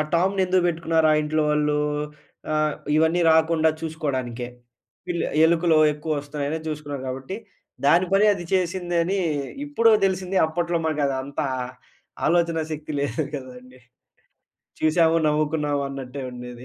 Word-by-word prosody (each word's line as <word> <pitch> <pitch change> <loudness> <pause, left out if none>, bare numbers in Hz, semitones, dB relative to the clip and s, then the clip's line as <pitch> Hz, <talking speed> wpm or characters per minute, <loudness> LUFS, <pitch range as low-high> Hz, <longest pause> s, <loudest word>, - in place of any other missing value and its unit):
టామ్‌ని 190 +3 +2
ఎందుకు 185 0 +2
పెట్టుకున్నారు 160 -1 +1
ఆ - - +4
ఇంట్లో 155 +1 0
వాళ్ళు? 150 0 +1 0.7
ఆహ్, 155 0 +1 0.2
ఇవన్నీ 160 +2 +3
రాకుండా 160 0 +4
చూసుకోవడానికే. 130 -7 -3 0.6
పిల్ 175 -1 -1 0.2
ఎలుకులో 165 -1 +3
ఎక్కువ 150 +1 -4
వస్తున్నాయని 145 +2 -4
చూసుకున్నారు 145 -3 -5
కాబట్టి, 135 +9 -5 0.5
దాని 175 +5 +5
పని 200 +2 +5
అది 175 -2 -7
చేసిందని 175 -1 -1
అని 195 +3 -1 0.5
ఇప్పుడో 230 -6 +4
తెలిసింది. 190 0 -2
అప్పట్లో 170 +1 -1
మనకు 150 -2 0 0.2
అంత 140 +1 -5 0.9
ఆలోచనా 170 -1 +2
శక్తి 155 0 -6
లేదు 145 +3 -2
కదండీ. 125 -1 -9 1.0
చూసాము, 160 +1 +3
నవ్వుకున్నావు 150 -1 0
అన్నట్టే 135 0 -7
ఉండేది. 125 0 -9
155 Hz, 125 wpm, -24 LUFS, 145-170 Hz, 1.0 s, దాని